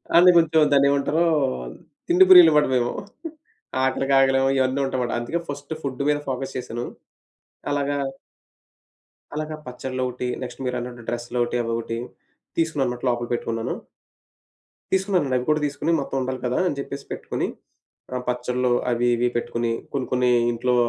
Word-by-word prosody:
అంటె 180 Hz, +2 st, +8 dB
కొంచెం 160 Hz, -2 st, +4 dB
దాన్నెమంటారు 140 Hz, +3 st, +3 dB, 0.8 s
తిండి 360 Hz, +2 st, +6 dB
ప్రియులు 360 Hz, -2 st, +10 dB
మాట‌ 150 Hz, 0 st, +4 dB
మేము. 120 Hz, -1 st, +1 dB, 0.9 s
ఆకలికాగలేము 135 Hz, 0 st, +3 dB
ఇయన్నీ 130 Hz, +1 st, +1 dB
ఉంటాయన్నమాట. 130 Hz, -2 st, -2 dB
అందుకే 140 Hz, +9 st, -2 dB
ఫస్ట్ 145 Hz, +1 st, -7 dB
ఫుడ్ 140 Hz, 0 st, -3 dB
మీద 145 Hz, 0 st, +2 dB
ఫోకస్ 135 Hz, +1 st, -4 dB
చేశాను. 120 Hz, -1 st, -4 dB, 0.8 s
అలాగా... 145 Hz, 0 st, 0 dB, 1.4 s
అలాగా 155 Hz, 0 st, -3 dB
పచ్చడ్లోక‌టి 125 Hz, 0 st, -4 dB
నెక్స్టు 125 Hz, +1 st, -6 dB
మీరన్నట్టు 125 Hz, -1 st, -4 dB
డ్రెస్‌లొకటి 120 Hz, 0 st, -1 dB
అవొకటి 115 Hz, 0 st, -3 dB, 0.6 s
తీసుకున్నానన్నమాట. 135 Hz, -7 st, 0 dB
లోపల 120 Hz, 0 st, -1 dB
పెట్టుకున్నాను. 115 Hz, -1 st, -2 dB, 1.2 s
తీసుకున్నానండి. 185 Hz, -8 st, +1 dB
అవి 125 Hz, -, -3 dB
కూడా 155 Hz, 0 st, +2 dB
తీసుకొని 145 Hz, +3 st, -1 dB
మొత్తం 135 Hz, -, -4 dB
ఉండాలి 130 Hz, 0 st, -3 dB
కదా! 125 Hz, +1 st, 0 dB
అని 145 Hz, -, -2 dB
చెప్పేసి 140 Hz, 0 st, -6 dB
పెట్టుకొని. -, -, -3 dB, 0.7 s
ఆ -, -, -1 dB
పచ్చడ్లు 125 Hz, 0 st, 0 dB, 0.2 s
అవి 120 Hz, 0 st, +1 dB
ఇవి 120 Hz, +1 st, +1 dB
పెట్టుకొని. 120 Hz, 0 st, -2 dB, 0.2 s
కొన్ని 135 Hz, -2 st, -2 dB
కొన్ని 125 Hz, 0 st, +3 dB, 0.2 s
ఇంట్లో 125 Hz, +1 st, 0 dB
130 Hz, 125 wpm, -23 LUFS, 120-145 Hz, 1.4 s, ప్రియులు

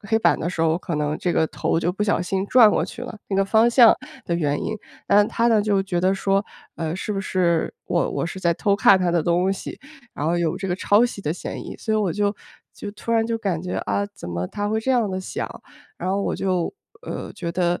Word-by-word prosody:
黑 220 Hz, +2 st, 0 dB
板 -, -, +3 dB
的 170 Hz, -, -2 dB
时 170 Hz, -, -4 dB
候， 165 Hz, 0 st, +3 dB
可 175 Hz, -4 st, -4 dB
能 150 Hz, 0 st, -1 dB
这 175 Hz, -, -1 dB
个 160 Hz, -, +2 dB
头 165 Hz, -, -1 dB
就 175 Hz, +1 st, 0 dB
不 210 Hz, -, -3 dB
小 205 Hz, -4 st, +1 dB
心 190 Hz, +2 st, -1 dB
转 240 Hz, -4 st, +7 dB
过 -, -, +1 dB
去 -, -, -9 dB
了， 245 Hz, -3 st, -6 dB
那 195 Hz, -, -1 dB
个 195 Hz, -, +3 dB
方 225 Hz, +4 st, +4 dB
向 235 Hz, -2 st, +7 dB, 0.3 s
的 170 Hz, -, -1 dB
原 145 Hz, -4 st, 0 dB
因。 220 Hz, -, -2 dB, 0.3 s
但 205 Hz, +1 st, +5 dB
她 235 Hz, 0 st, +1 dB
呢， 220 Hz, -3 st, +4 dB
就 200 Hz, -2 st, +2 dB
觉 185 Hz, -3 st, -1 dB
得 185 Hz, +2 st, +3 dB
说， 195 Hz, +1 st, +1 dB, 0.3 s
呃， 160 Hz, 0 st, -3 dB
是 210 Hz, -, -3 dB
不 195 Hz, -, -2 dB
是 175 Hz, -4 st, 0 dB
我 170 Hz, -, 0 dB
我 -, -, -2 dB
是 190 Hz, +2 st, -7 dB
在 170 Hz, -1 st, +2 dB
偷 200 Hz, +4 st, +1 dB
看 200 Hz, -2 st, +6 dB
她 175 Hz, -2 st, +1 dB
的 170 Hz, -2 st, +2 dB
东 180 Hz, +3 st, +2 dB
西， 195 Hz, -, -7 dB, 0.3 s
然 150 Hz, -, -3 dB
后 170 Hz, -, +1 dB
有 170 Hz, 0 st, 0 dB
这 195 Hz, 0 st, -4 dB
个 180 Hz, -, 0 dB
抄 205 Hz, +5 st, +3 dB
袭 200 Hz, -4 st, -8 dB
的 150 Hz, -, -1 dB
嫌 175 Hz, -, -6 dB
疑。 -, -, -8 dB
所 220 Hz, -, -2 dB
以 -, -, +3 dB
我 200 Hz, -6 st, +1 dB
就 205 Hz, 0 st, 0 dB, 0.4 s
就 205 Hz, -, -7 dB
突 230 Hz, +3 st, -5 dB
然 225 Hz, -1 st, +3 dB
就 230 Hz, 0 st, -2 dB
感 185 Hz, -6 st, -2 dB
觉， 180 Hz, -, -3 dB
啊， 200 Hz, -, 0 dB
怎 85 Hz, -, -9 dB
么 85 Hz, +1 st, -3 dB
她 205 Hz, 0 st, -3 dB
会 220 Hz, +1 st, 0 dB
这 265 Hz, -, -1 dB
样 235 Hz, -5 st, +2 dB
地 190 Hz, 0 st, -3 dB
想， -, -, -4 dB, 0.5 s
然 185 Hz, -, -3 dB
后 200 Hz, +1 st, 0 dB
我 -, -, -1 dB
就， 185 Hz, -, -1 dB, 0.3 s
呃， -, -, -6 dB
觉 170 Hz, -2 st, -5 dB
得， 175 Hz, 0 st, 0 dB
190 Hz, 275 characters per minute, -23 LUFS, 170-210 Hz, 0.5 s, 转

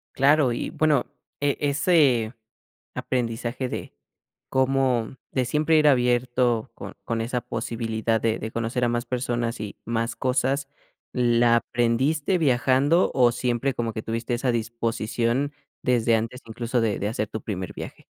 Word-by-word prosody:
Claro 140 Hz, -2 st, +4 dB
y -, -, -3 dB
bueno, 150 Hz, -5 st, +2 dB, 0.3 s
e 145 Hz, -1 st, +1 dB
ese 140 Hz, -6 st, +3 dB, 0.6 s
aprendizaje 120 Hz, +1 st, -2 dB
de -, -, -6 dB, 0.6 s
cómo 130 Hz, -2 st, +1 dB, 0.2 s
de 130 Hz, -, +2 dB
siempre 155 Hz, +5 st, +2 dB
ir 150 Hz, -1 st, +5 dB
abierto 125 Hz, -2 st, +2 dB
con -, -, -9 dB
con 115 Hz, -1 st, -2 dB
esa 120 Hz, +2 st, -2 dB
posibilidad 115 Hz, -1 st, -2 dB
de 115 Hz, 0 st, 0 dB
de 110 Hz, -, -4 dB
conocer 115 Hz, +2 st, -1 dB
a -, -, +2 dB
más 120 Hz, +1 st, -1 dB
personas 120 Hz, -1 st, -2 dB
y 105 Hz, -2 st, -6 dB
más 115 Hz, +1 st, -2 dB
cosas, 135 Hz, +2 st, 0 dB, 0.4 s
¿la 120 Hz, -1 st, +3 dB
aprendiste 130 Hz, +9 st, +1 dB
viajando 140 Hz, +2 st, +3 dB
o 120 Hz, -2 st, +4 dB
siempre 125 Hz, +2 st, 0 dB
como 115 Hz, -1 st, -2 dB
que 110 Hz, -, -5 dB
tuviste 115 Hz, +2 st, -3 dB
esa 125 Hz, 0 st, 0 dB
disposición 115 Hz, +3 st, -1 dB, 0.3 s
desde 120 Hz, -2 st, +2 dB
antes 115 Hz, +3 st, -2 dB
incluso 120 Hz, +2 st, -2 dB
de 110 Hz, -3 st, +1 dB
de 100 Hz, -, -1 dB
hacer 110 Hz, -2 st, -2 dB
tu 110 Hz, -, -6 dB
primer 95 Hz, -4 st, -5 dB
viaje? -, -, -9 dB
120 Hz, 145 wpm, -25 LUFS, 115-130 Hz, 0.6 s, ir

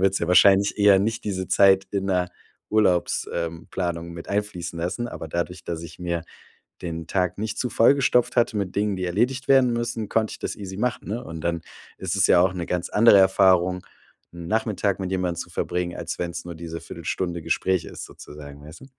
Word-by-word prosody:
Du -, -, -3 dB
willst 95 Hz, 0 st, +3 dB
ja 85 Hz, -, -2 dB
wahrscheinlich 100 Hz, +3 st, +5 dB
eher 100 Hz, -2 st, +6 dB
nicht 110 Hz, +3 st, -1 dB
diese 95 Hz, -3 st, -3 dB
Zeit 95 Hz, -1 st, +5 dB
in 100 Hz, -1 st, -2 dB
der 90 Hz, -2 st, 0 dB, 0.4 s
Urlaubs 100 Hz, -5 st, +2 dB
ähm, 85 Hz, 0 st, -4 dB
Planung 85 Hz, -2 st, -3 dB
mit 85 Hz, 0 st, -9 dB
einfließen 100 Hz, -4 st, -3 dB
lassen. 90 Hz, +8 st, -3 dB
Aber 80 Hz, -, -7 dB
dadurch, 85 Hz, +2 st, -3 dB
dass 85 Hz, -1 st, -5 dB
ich 85 Hz, 0 st, -10 dB
mir 85 Hz, -1 st, -2 dB, 0.6 s
den 85 Hz, -2 st, -5 dB
Tag 90 Hz, +1 st, -1 dB
nicht 110 Hz, +1 st, -3 dB
zu 125 Hz, -, -1 dB
voll 115 Hz, +5 st, +5 dB
gestopft 125 Hz, -3 st, +2 dB
hatte 120 Hz, -2 st, +2 dB
mit 100 Hz, -3 st, -2 dB
Dingen, 100 Hz, -1 st, 0 dB
die 95 Hz, -, -3 dB
erledigt 120 Hz, +9 st, 0 dB
werden 130 Hz, -3 st, +5 dB
müssen, 120 Hz, -2 st, -3 dB
konnte 110 Hz, -1 st, 0 dB
ich -, -, -8 dB
das -, -, -4 dB
easy 95 Hz, -2 st, -7 dB
machen, 125 Hz, +3 st, -2 dB
ne? 115 Hz, +4 st, -3 dB
Und 80 Hz, -7 st, -8 dB
dann 85 Hz, 0 st, -1 dB, 0.3 s
ist -, -, -3 dB
es -, -, +4 dB
ja 90 Hz, -, +5 dB
auch 90 Hz, 0 st, +3 dB
'ne 85 Hz, -2 st, -4 dB
ganz 90 Hz, -1 st, -2 dB
andere 105 Hz, -1 st, +6 dB
Erfahrung 95 Hz, -1 st, +4 dB, 0.5 s
'n 85 Hz, -1 st, -9 dB
Nachmittag 105 Hz, -2 st, 0 dB
mit 95 Hz, -1 st, -3 dB
jemand 90 Hz, -2 st, -1 dB
zu -, -, -5 dB
verbringen, 90 Hz, 0 st, -3 dB
als -, -, -5 dB
wenn's 85 Hz, -1 st, -4 dB
nur 85 Hz, -1 st, -8 dB
diese 85 Hz, 0 st, -7 dB
1/4 -, -, -10 dB
Stunde 85 Hz, -2 st, -2 dB
Gespräch 95 Hz, +2 st, 0 dB
ist -, -, -8 dB
sozusagen, 70 Hz, -1 st, -12 dB
weißt 80 Hz, +2 st, -12 dB
du? -, -, -12 dB
95 Hz, 210 wpm, -24 LUFS, 85-105 Hz, 0.6 s, eher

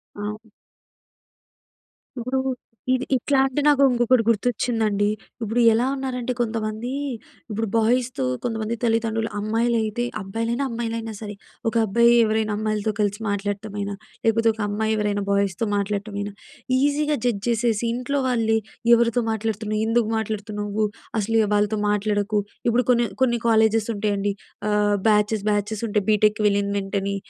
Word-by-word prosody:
అవును. 210 Hz, +2 st, -6 dB, 1.7 s
ఇప్పుడు 255 Hz, +3 st, -1 dB, 0.5 s
ఇది 260 Hz, 0 st, 0 dB
ఇట్లా 270 Hz, +2 st, +1 dB
అంటే 270 Hz, +2 st, -1 dB
నాకు 285 Hz, -2 st, +5 dB
ఇంకొకటి 240 Hz, 0 st, +3 dB
గుర్తొచ్చిందండి. 220 Hz, -2 st, +1 dB, 0.4 s
ఇప్పుడు 225 Hz, +3 st, 0 dB
ఎలా 230 Hz, +3 st, +2 dB
ఉన్నారంటే 255 Hz, -2 st, -3 dB
కొంతమంది 225 Hz, +1 st, -2 dB, 0.6 s
ఇప్పుడు 225 Hz, +1 st, -1 dB
బాయ్స్‌తో 235 Hz, -, +1 dB, 0.2 s
కొంతమంది 225 Hz, -1 st, -2 dB
తల్లిదండ్రులు 225 Hz, -1 st, +1 dB
అమ్మాయిలు 230 Hz, +3 st, +1 dB
అయితే 225 Hz, +3 st, -2 dB, 0.2 s
అబ్బాయిలైనా 230 Hz, +6 st, -2 dB
అమ్మాయిలైనా 230 Hz, -1 st, -3 dB
సరే, 210 Hz, -2 st, -6 dB, 0.4 s
ఒక -, -, -8 dB
అబ్బాయి 235 Hz, +3 st, +4 dB
ఎవరైనా 215 Hz, -1 st, 0 dB
అమ్మాయిలతో 215 Hz, 0 st, -1 dB
కలిసి 205 Hz, 0 st, 0 dB
మాట్లాడటం 205 Hz, +1 st, -3 dB
అయిన 200 Hz, 0 st, -2 dB, 0.3 s
లేకపోతే 225 Hz, 0 st, +3 dB
ఒక 225 Hz, -, -18 dB
అమ్మాయి 220 Hz, +1 st, 0 dB
ఎవరైనా 205 Hz, -1 st, 0 dB
బాయ్స్‌తో 200 Hz, +1 st, +1 dB
మాట్లాడటం 200 Hz, +1 st, -2 dB
అయిన, 205 Hz, 0 st, -3 dB, 0.5 s
ఈజీగా 290 Hz, +1 st, +1 dB
జడ్జ్ 210 Hz, -5 st, 0 dB
చేసేసి, 230 Hz, -1 st, +1 dB
ఇంట్లో 275 Hz, +3 st, -1 dB
వాళ్ళే 225 Hz, -3 st, +2 dB, 0.4 s
ఎవరితో 235 Hz, 0 st, +3 dB
మాట్లాడుతున్నావు? 215 Hz, -1 st, -2 dB
ఎందుకు 230 Hz, -1 st, +2 dB
మాట్లాడుతున్నావు? 210 Hz, -1 st, -2 dB, 0.3 s
అసలు 225 Hz, +2 st, -1 dB
య -, -, 0 dB
వాళ్ళతో 210 Hz, +1 st, +1 dB
మాట్లాడకు. 210 Hz, 0 st, +1 dB, 0.3 s
ఇప్పుడు 245 Hz, +1 st, +2 dB
కొన్ని 235 Hz, -1 st, +3 dB, 0.2 s
కొన్ని 240 Hz, -2 st, +2 dB
కాలేజెస్ 220 Hz, 0 st, +3 dB
ఉంటాయండి. 205 Hz, -1 st, 0 dB, 0.4 s
ఆహ్, 210 Hz, 0 st, +2 dB
బ్యాచెస్ 210 Hz, 0 st, +2 dB
బ్యాచెస్ 210 Hz, +2 st, -1 dB
ఉంటాయి. 205 Hz, -2 st, 0 dB
బీటెక్కి 210 Hz, 0 st, +3 dB
వెళ్ళిన 200 Hz, 0 st, +1 dB
వెంటనే 195 Hz, 0 st, -2 dB
220 Hz, 130 wpm, -23 LUFS, 205-235 Hz, 1.7 s, నాకు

